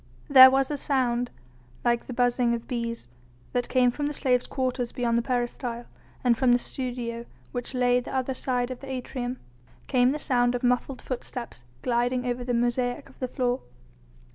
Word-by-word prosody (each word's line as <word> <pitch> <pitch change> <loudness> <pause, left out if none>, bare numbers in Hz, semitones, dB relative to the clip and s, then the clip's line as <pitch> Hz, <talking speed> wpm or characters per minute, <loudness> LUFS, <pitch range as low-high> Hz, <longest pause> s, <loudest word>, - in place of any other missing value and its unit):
There 260 -2 +10
was 270 +1 +1
a 295 - -1
sound 245 -3 0 0.6
like 235 0 +1
the 255 - -5
buzzing 245 -1 +2
of 230 - -8
bees 235 - -3 0.5
that 245 -1 -1
came 250 -1 +4
from 290 +3 -2
the 295 - -3
slaves' 250 -3 +1
quarters 255 -2 -2
beyond 240 -2 0
the 235 - +3
peristyle, 240 -1 -2 0.4
and 245 -2 +4
from 255 +1 +3
the - - +6
studio, 240 -2 -4 0.2
which 245 +1 -4
lay 245 0 +3
the 245 - -7
other 265 0 -1
side 250 -1 -1
of 250 - -6
the 275 - -9
atrium, 250 -1 -4 0.5
came 250 -1 +3
the 295 - -1
sound 245 -4 +1
of 245 - -3
muffled 250 +1 0
footsteps 240 - -6 0.2
gliding 245 +1 +1
over 245 0 -2
the 245 0 -1
mosaic 245 +3 0
of 265 - -20
the 255 - -1
floor. 250 0 0
245 Hz, 180 wpm, -26 LUFS, 240-260 Hz, 0.6 s, There